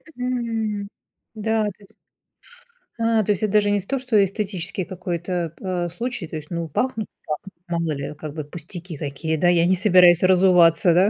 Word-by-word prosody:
Мгм, 230 -5 -2 0.5
да, 220 +1 0
то - - -32
есть 200 - -19 1.1
А, 225 -1 +2
то 210 - +1
есть 205 +1 -1
это 210 - 0
даже 205 -1 +4
не 205 - +2
сто, 255 +8 -3
что 225 -6 +3
эстетический 195 -2 -3
какой-то 175 -2 -3
п - - -12 0.2
а, - - -3
случай. 230 0 -4
То 160 - -8
есть, 150 0 -10
ну, 170 -1 -3
пахнут 220 - -2 0.2
пах 150 -1 -2 0.3
мало 170 -2 -1
ли, 140 0 -4
как 150 -1 -7
бы 155 -2 -4
пустяки 170 +2 -9
какие, 155 +2 -3
да? 175 +3 +3
Я 170 -1 +4
не 185 - +4
собираюсь 180 -2 +6
разуваться, 180 -2 +5
да, 190 +4 +5
185 Hz, 185 wpm, -22 LUFS, 170-210 Hz, 1.1 s, собираюсь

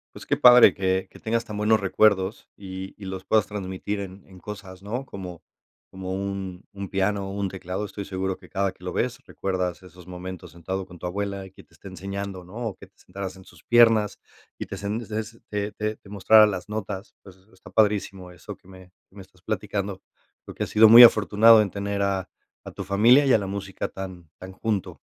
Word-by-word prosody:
Pues, - - -10
qué - - 0
padre 125 -1 +8
que 95 -1 -1
que - - -15
tengas 115 +1 -1
tan 105 -2 -7
buenos 110 0 +2
recuerdos, 100 +1 +2
y 95 -1 -8
y 105 - -13
los 95 -1 -6
puedas 110 -2 +2
transmitir 100 0 -4
en 95 0 -8
en 95 -1 -15
cosas, 95 -2 -9
¿no?, 120 +7 -4
como 90 -7 -9 0.5
como 95 0 -6
un 95 -1 -5
un 100 -1 -7
piano 100 0 0
o 95 - -6
un 100 -1 -2
teclado. 95 +1 -5
Estoy 100 0 -6
seguro 95 0 -3
que 90 - -17
cada 100 -1 -1
que 90 - -16
lo 90 - -4
ves, 125 +1 -1
recuerdas 90 -1 -3
esos 90 0 -15
momentos 90 0 -8
sentado 95 +3 -5
con 90 -2 -14
tu - - -7
abuela 100 +1 -3
y 95 - -13
que - - -17
te - - -30
esté 100 - -12
enseñando, 95 0 -6
¿no?, 90 - -14
o 105 -5 -3
que - - -13
te - - -40
sentaras 95 0 -7
en 95 - -14
sus - - -19
piernas, 115 -3 +4 0.4
y - - -6
te - - -6
sent 105 +4 -4
te 110 +1 -3
sent 110 +2 -13
te 105 0 -3
te 110 0 -3
te 100 - -18
mostrara 105 +2 +6
las 95 0 -5
notas. 100 -1 -5
Pues, 95 -2 -15 0.2
está 95 - -16
padrísimo 100 -4 0
eso 90 - -10
que 95 - -23
me 95 -1 -15 0.2
que 100 - -20
me 100 - -8
estás 95 -1 -19
platicando. 100 -1 -3 0.4
Creo - - -10
que - - -2
has - - -5
sido 110 +1 +7
muy 115 +2 +11
afortunado 110 0 +7
en 100 - -2
tener 100 0 -3
a 95 -2 -1 0.3
a - - -9
tu - - -7
familia 115 +8 +5
y 135 - +4
a - - +7
la 100 -2 -4
música 100 0 -5
tan 95 -4 -9
tan 95 +1 -9
junto. 105 0 -3
100 Hz, 220 wpm, -25 LUFS, 95-105 Hz, 0.5 s, muy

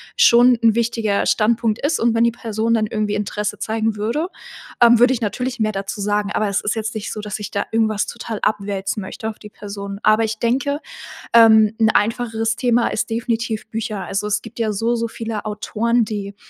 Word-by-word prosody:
schon 245 - +6
'n 225 -2 +5
wichtiger 225 -3 0
Standpunkt 225 0 +1
ist 310 +1 +1
und 235 0 +2
wenn 230 - +3
die 235 - +3
Person 225 -1 -2
dann 215 -2 +1
irgendwie 210 -1 -2
Interesse 210 0 -3
zeigen 220 0 -1
würde, 240 - -1 0.5
ähm, 240 0 +7
würde 250 +2 +5
ich 250 - -3
natürlich 245 +3 -3
mehr 215 0 +1
dazu 195 +2 -4
sagen, 205 0 0
aber 215 - 0
es 200 - 0
ist 210 - -1
jetzt 220 0 -3
nicht 210 - -4
so, 215 - -5
dass 210 0 -5
ich 205 - -6
da 200 - -1
irgendwas 220 -2 +1
total 230 -2 -6
abwälzen 200 -1 -2
möchte 220 +3 -5
auf 220 - -8
die 210 - -11
Person. 200 -1 -7
Aber 215 +1 +4
ich 220 0 -3
denke, 275 +5 0 0.5
ähm, 220 -2 +7
'n 220 -1 +4
einfacheres 225 +1 0
Thema 240 -2 +2
ist 220 - -2
definitiv 225 -1 -2
Bücher. 220 -2 -4
Also, 200 +1 -2
es 210 0 0
gibt 230 +1 -12
ja 215 -2 0
so 230 +4 0
so 230 0 -1
viele 225 -2 -5
Autoren, 230 +3 0
die 200 -1 -5
220 Hz, 205 wpm, -20 LUFS, 210-230 Hz, 0.5 s, ähm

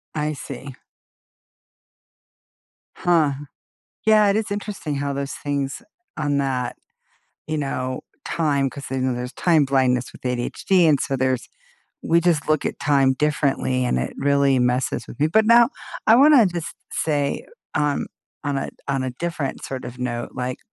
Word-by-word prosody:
I 150 0 -1
see. 135 -1 -8 2.2
Huh. 165 -5 +2 0.7
Yeah, 215 -2 +6
it 200 - +2
is 220 -1 -1
interesting 205 -7 -4
how 140 0 -2
those 140 0 -3
things 140 -1 -3 0.4
on 145 -2 0
that, 130 -3 -1 0.7
you 155 0 -1
know, 130 -3 -3 0.2
time, 140 -4 +1
'cause 140 +1 -9
they 135 - -2
know 130 0 0
there's 125 +1 -5
time 160 -5 +3
blindness 130 -2 +1
with - - -16
ADHD, 125 +8 +1
and 145 -3 +4
so 140 -5 -1
there's 130 -1 -1 0.6
we 170 +1 +4
just 170 -4 +1
look 155 -2 +2
at - - -3
time 135 -2 +3
differently, 135 -3 0
and 65 - +1
it 65 - -2
really 140 -1 +3
messes 125 +1 0
with - - -11
me, 150 - +3
but 215 +7 +3
now 235 +1 +6 0.4
I 225 - +7
wanna 280 -2 +7
just 175 -4 -3 0.2
say, 145 -3 -1 0.3
um, 145 -1 0 0.4
on 145 -1 0
a - - -3 0.2
on 135 -1 0
a 130 - -1
different 160 -1 -4
sort 130 -1 -5
of 125 +1 -9
note, 120 -1 -3
like 125 0 -3
140 Hz, 155 wpm, -22 LUFS, 130-160 Hz, 2.2 s, I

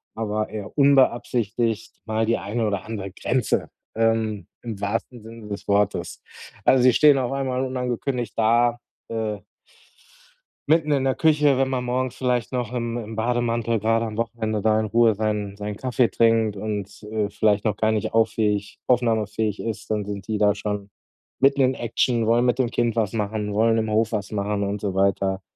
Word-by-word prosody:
aber 110 -1 -2
eher 105 +5 -7
unbeabsichtigt 120 -5 +2
mal 110 0 0
die 115 +1 +1
eine 110 +3 -2
oder 100 -3 -2
andere 100 -3 -5
Grenze, 120 +4 -1 0.3
ähm, 115 -2 0 0.2
im 110 -4 -6
wahrsten 115 +3 -3
Sinne 115 0 -11
des 100 0 -7
Wortes. 100 -3 0 0.4
Also, 130 -2 +5
sie 125 -1 +6
stehen 145 +1 +6
auf 125 0 -2
einmal 130 -1 -1
unangekündigt 125 -2 -3
da, 120 +2 +3 0.3
äh 110 -2 -2 1.3
mitten 155 -1 +3
in 140 -2 +2
der 130 - +1
Küche, 150 -3 +3
wenn 135 0 +1
man 130 -2 -1
morgens 125 0 -2
vielleicht 125 -3 -1
noch 125 -3 -2
im 120 -1 -2
im 110 -1 -6
Bademantel, 115 0 0
grade 115 +2 +1
am 110 -1 -5
Wochenende, 110 -2 -2
da 110 +1 +3
in 110 - 0
Ruhe 115 0 +3
seinen 105 -1 -2
seinen 105 0 -5
Kaffee 125 +1 +1
trinkt 115 0 +2
und, 105 0 -5
äh, 105 -2 -1
vielleicht 105 0 +1
noch 105 -2 +1
gar 110 +1 +1
nicht 110 0 -2
auf 115 0 +4
fähig 105 -2 -1
aufnahmefähig 110 -3 +1
ist, 115 -2 -5
dann 105 -2 -1
sind 100 -1 -6
die 110 - -1
da 105 -1 +4
schon 105 -1 -4 0.5
mitten 140 +1 +4
in 130 0 +3
Action, 120 -1 0
wollen 120 +2 +3
mit 125 +1 +1
dem 125 - +2
Kind 120 -1 0
was 110 -4 0
machen, 105 -1 -2
wollen 115 +2 +3
im 110 - -1
Hof 110 0 +2
was 105 -3 -3
machen 100 0 -1
und 100 +1 -2
so 100 -2 -2
weiter. 95 0 +1
110 Hz, 180 wpm, -23 LUFS, 105-120 Hz, 1.3 s, sie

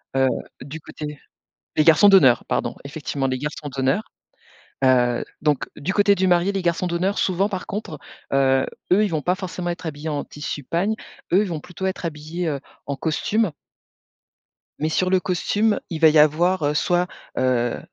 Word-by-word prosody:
Heu, 135 0 +4 0.3
du 140 +5 -7
côté 150 -1 -8 0.6
les 155 - +4
garçons 165 +6 +7
d'honneur 135 - +6
pardon, - - -1
effectivement 140 -1 -4
les 130 -1 -1
garçons 150 +1 -5
d'honneur, 135 +9 +1 0.8
heu, 125 -2 +3 0.2
donc 150 -3 +1
du 180 +7 -2
côté 205 0 +4
du 190 -1 +1
marié 175 +1 +3
les 195 - -2
garçons 170 +1 0
d'honneur 180 +3 0
souvent 190 +2 +1
par 185 -2 -4
contre, 195 -7 -5 0.3
heu, 135 -1 +3 0.3
eux 205 +4 +5
ils - - +1
vont 160 -4 -2
pas 180 - +2
forcément 185 -2 -5
être 175 +1 -6
habillés 155 0 -5
en 145 -2 -2
tissu 145 0 -6
pagne, 185 +10 0 0.4
eux 190 +4 +5
ils 210 - -3
vont 165 -3 -3
plutôt 180 +4 -8
être 190 -2 -2
habillés, 160 +3 -4
heu, 140 -3 -2 0.3
en 140 - -3
costume 170 +6 0 1.3
mais 155 - 0
sur 185 +3 +1
le 185 -1 +3
costume 205 +4 +1
il 160 -2 -4
va 160 - +8
y 155 0 +4
avoir, 160 +4 +4
heu, 145 +1 +1
soit, 175 +4 +2 0.3
heu, 125 -2 +1
160 Hz, 180 wpm, -22 LUFS, 145-185 Hz, 1.3 s, va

